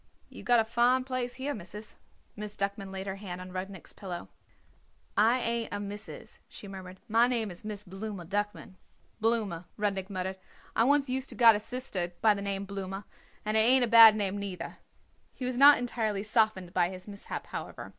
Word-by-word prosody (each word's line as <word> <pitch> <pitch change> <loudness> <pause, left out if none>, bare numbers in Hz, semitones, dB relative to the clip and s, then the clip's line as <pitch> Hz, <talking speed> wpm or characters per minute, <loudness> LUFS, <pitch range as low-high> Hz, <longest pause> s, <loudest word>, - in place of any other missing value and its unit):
"You - - -11
got 240 -1 +4
a 225 - +2
fine 240 +3 +3
place 255 -1 -3
here, 270 +3 -3
Missis." 210 +1 -9 0.4
Miss 210 0 -7
Duckman 200 0 -3
laid 190 0 -5
her 195 0 -4
hand 185 -3 -7
on 185 0 -8
Rudnik's 185 0 -7
pillow. 180 -3 -7 0.9
"I 225 +5 +4
ain't 230 -1 -1
a - - -3
Missis," 205 +1 -8
she 205 - -10
murmured. 190 -1 -9
"My 230 +2 +4
name 230 -5 -1
is 175 - -12
Miss 210 -1 -6
Blooma 195 -1 -6
Duckman." 205 0 -3 0.4
"Blooma," 215 -7 0
Rudnik 195 -2 -1
muttered. 190 -1 -4 0.4
"I 225 - +4
once 285 +1 +3
used 260 +1 -2
to - - -7
got 230 -3 +7
a - - -1
sister 205 -7 -4
by 215 -1 +5
the 200 - -5
name 200 0 -2
Blooma, 195 0 -5 0.4
and 215 +1 0
it - - +5
ain't 250 +3 +6
a - - -4
bad 225 -2 +9
name, 200 -1 -1
neither." 185 -4 -6 0.6
He 255 - -5
was 250 0 -1
not 280 +3 +8
entirely 220 -5 -2
softened 215 -5 +1
by 175 -2 +2
his 185 +1 -9
mishap, 200 -1 -7
however. - - -7
205 Hz, 190 wpm, -30 LUFS, 190-230 Hz, 0.9 s, bad